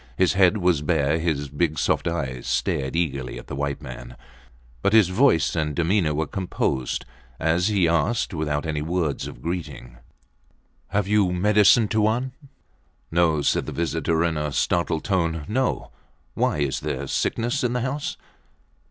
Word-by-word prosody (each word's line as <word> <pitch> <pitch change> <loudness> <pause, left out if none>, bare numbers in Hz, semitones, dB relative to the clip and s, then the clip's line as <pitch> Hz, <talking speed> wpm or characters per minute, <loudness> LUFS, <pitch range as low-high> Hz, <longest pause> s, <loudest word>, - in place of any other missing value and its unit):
His 95 - +3
head 95 +1 +4
was 90 -6 +2
bare. 75 0 +1
His 80 -4 -1
big, 75 +3 -1
soft - - +1
eyes 70 -7 -3
stared 65 +3 -1
eagerly 70 -7 -2
at - - -9
the - - -6
white 70 0 -3
man, - - -9 0.6
but 100 - +1
his 110 -5 +6
voice 95 - +3
and 75 -2 -1
demeanour 85 -2 +1
were 80 +2 0
composed 70 -7 -2 0.3
as 85 +3 +2
he 100 -5 +2
asked, 85 +7 +1
without 75 -1 -2
any 75 -2 -2
words 80 -2 -1
of - - -11
greeting 70 -8 -5 0.9
Have 100 -1 -1
you 105 -3 +3
medicine, 105 +4 +4
Tuan? 110 +5 +1 0.8
No, 80 -3 +2
said - - +1
the - - -3
visitor 80 0 0
in 80 -2 0
a 75 -1 -2
startled 80 +1 0
tone. 85 -5 0
No. 130 +5 -1 0.4
Why? - - 0
Is 70 -2 0
there 70 +2 -3
sickness 115 - -1
in 125 -1 0
the 125 - -1
house? 135 +4 -3
85 Hz, 155 wpm, -24 LUFS, 75-95 Hz, 0.9 s, his